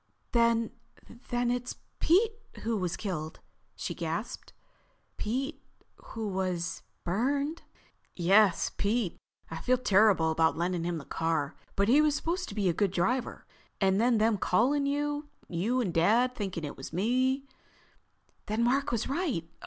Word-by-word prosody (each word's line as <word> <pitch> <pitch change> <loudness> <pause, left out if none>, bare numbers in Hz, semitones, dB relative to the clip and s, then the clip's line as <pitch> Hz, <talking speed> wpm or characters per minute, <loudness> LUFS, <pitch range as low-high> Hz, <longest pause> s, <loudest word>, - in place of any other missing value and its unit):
"Then—then 235 +1 -1
it's 245 0 -3 0.2
Pete 425 +7 +4 0.3
who 230 0 -1
was 180 -4 -2
killed?" 160 -6 -4 0.4
she - - -4
gasped. - - -4 0.7
"Pete 270 +8 -2 0.4
who 220 -1 -5
was—burned?" 195 - -2 0.5
"Yes, 190 +1 +4
Pete. 205 -2 0 0.3
I 165 - -4
feel 255 +9 +2
terrible 200 -7 +4
about 160 0 +2
lending 175 0 -1
him 175 -1 -1
the 145 - -8
car. 160 -3 -1 0.2
But 200 +1 +2
he 275 +6 +6
was 305 -1 +3
supposed 355 +4 -2
to 200 - -8
be 205 -3 +1
a 175 - +3
good 200 +3 +1
driver. 245 +8 -1 0.3
And 195 +1 +3
then 240 -1 +4
them 215 -1 +2
calling 275 +11 +2
you, 290 +1 -1 0.2
you 210 +9 0
and 190 -8 -2
Dad 225 +9 +3
thinking 190 -7 -4
it 145 - -5
was 135 - -8
me—" 255 - +1 1.0
"Then 215 +2 0
Mark 270 +4 +2
was 235 -2 -1
right. 275 - -1
220 Hz, 140 wpm, -29 LUFS, 180-255 Hz, 1.0 s, he